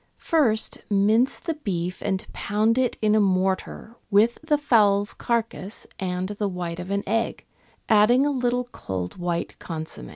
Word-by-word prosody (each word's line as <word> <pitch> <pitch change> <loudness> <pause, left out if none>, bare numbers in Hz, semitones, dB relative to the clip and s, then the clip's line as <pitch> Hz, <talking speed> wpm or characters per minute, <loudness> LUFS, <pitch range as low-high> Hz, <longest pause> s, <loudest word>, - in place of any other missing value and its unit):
First, 245 -10 +1
mince 215 +6 +3
the 330 - -3
beef 180 - -4
and 190 -2 -1
pound 215 +4 +1
it 255 -2 0
in 210 0 +4
a 215 - +4
mortar 190 +2 0 0.2
with 220 +3 +3
the 305 -1 +2
fowl's 205 -7 +3
carcase 230 -3 -2
and 185 0 -2
the 205 0 -2
white 175 -2 -4
of 180 +1 -6 0.2
egg, 225 +2 -1 0.4
adding 225 +5 +5
a 290 - +1
little 250 -2 0
cold 90 - -5
white 175 -1 -2
consomm^. 160 - -6
210 Hz, 150 wpm, -24 LUFS, 185-235 Hz, 0.4 s, adding